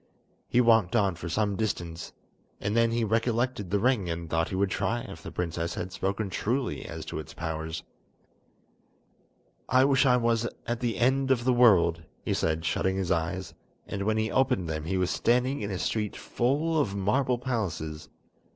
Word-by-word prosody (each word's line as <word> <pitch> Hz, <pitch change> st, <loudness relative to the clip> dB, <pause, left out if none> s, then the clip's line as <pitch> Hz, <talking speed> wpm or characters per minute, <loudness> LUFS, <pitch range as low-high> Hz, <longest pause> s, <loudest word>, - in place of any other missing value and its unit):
He 125 Hz, -, +3 dB
walked 115 Hz, -4 st, +4 dB
on 100 Hz, -5 st, +3 dB
for 85 Hz, 0 st, -7 dB
some 105 Hz, +3 st, 0 dB
distance, 85 Hz, -6 st, -3 dB, 0.5 s
and 105 Hz, +2 st, -2 dB
then 115 Hz, 0 st, +4 dB
he 115 Hz, 0 st, 0 dB
recollected 115 Hz, 0 st, 0 dB
the 100 Hz, -, +2 dB
ring 105 Hz, -4 st, +1 dB
and 85 Hz, 0 st, -4 dB
thought 80 Hz, 0 st, 0 dB
he -, -, -3 dB
would 95 Hz, 0 st, +1 dB
try 120 Hz, +1 st, 0 dB
if -, -, -9 dB
the -, -, -8 dB
princess 85 Hz, -1 st, -3 dB
had 90 Hz, +1 st, -4 dB
spoken 100 Hz, +1 st, -2 dB
truly 120 Hz, +7 st, -1 dB
as -, -, -7 dB
to -, -, -5 dB
its 75 Hz, -, -9 dB
powers. 80 Hz, -1 st, -4 dB, 1.9 s
"I 130 Hz, +1 st, +5 dB
wish 135 Hz, 0 st, +4 dB
I 125 Hz, -1 st, +5 dB
was 115 Hz, -1 st, +1 dB, 0.2 s
at 120 Hz, 0 st, -2 dB
the 120 Hz, -2 st, -1 dB
end 130 Hz, +2 st, +2 dB
of 125 Hz, -3 st, +2 dB
the 130 Hz, 0 st, +3 dB
world," 95 Hz, -9 st, +5 dB, 0.2 s
he -, -, +1 dB
said, 80 Hz, +1 st, 0 dB
shutting 95 Hz, +2 st, 0 dB
his 95 Hz, -2 st, -1 dB
eyes, 85 Hz, +3 st, -1 dB, 0.3 s
and 100 Hz, -, -5 dB
when 110 Hz, 0 st, +2 dB
he 110 Hz, 0 st, 0 dB
opened 115 Hz, -9 st, +2 dB
them 80 Hz, -1 st, -3 dB
he 95 Hz, +3 st, -1 dB
was 90 Hz, 0 st, +1 dB
standing 125 Hz, +3 st, +1 dB
in 100 Hz, -, -3 dB
a 95 Hz, -, -2 dB
street 105 Hz, +2 st, -1 dB
full 150 Hz, +6 st, 0 dB
of 100 Hz, -8 st, -2 dB
marble 120 Hz, +6 st, +1 dB
palaces. 85 Hz, -, -3 dB
105 Hz, 185 wpm, -28 LUFS, 85-120 Hz, 1.9 s, I